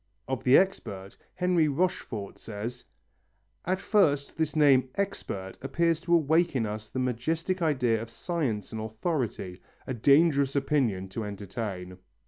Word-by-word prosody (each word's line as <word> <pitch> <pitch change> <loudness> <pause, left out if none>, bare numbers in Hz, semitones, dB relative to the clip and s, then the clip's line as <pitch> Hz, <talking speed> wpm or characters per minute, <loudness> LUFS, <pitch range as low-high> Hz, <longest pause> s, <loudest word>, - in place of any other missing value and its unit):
Of 130 -2 -3
the 130 +2 +7
expert, 100 - -1 0.2
Henry 180 -3 +2
Rochefort 140 - -2
says: 115 +3 -6 0.8
"At 185 +2 +1
first 145 -10 +2
this 160 -1 -1
name 135 -4 +5
expert 100 - -4
appears 165 +4 +1
to 170 0 +3
awake 165 +1 +3
in 120 -4 +1
us 105 0 -5
the - - -7
majestic 160 +9 -1
idea 125 -8 +2
of 115 - -7
science 115 - -3
and 110 -1 -4
authority. 110 - -3 0.2
A 130 - -3
dangerous 140 +2 +4
opinion 130 -9 +1
to 110 +4 -4
entertain." 100 -2 -6
130 Hz, 135 wpm, -28 LUFS, 110-165 Hz, 0.8 s, the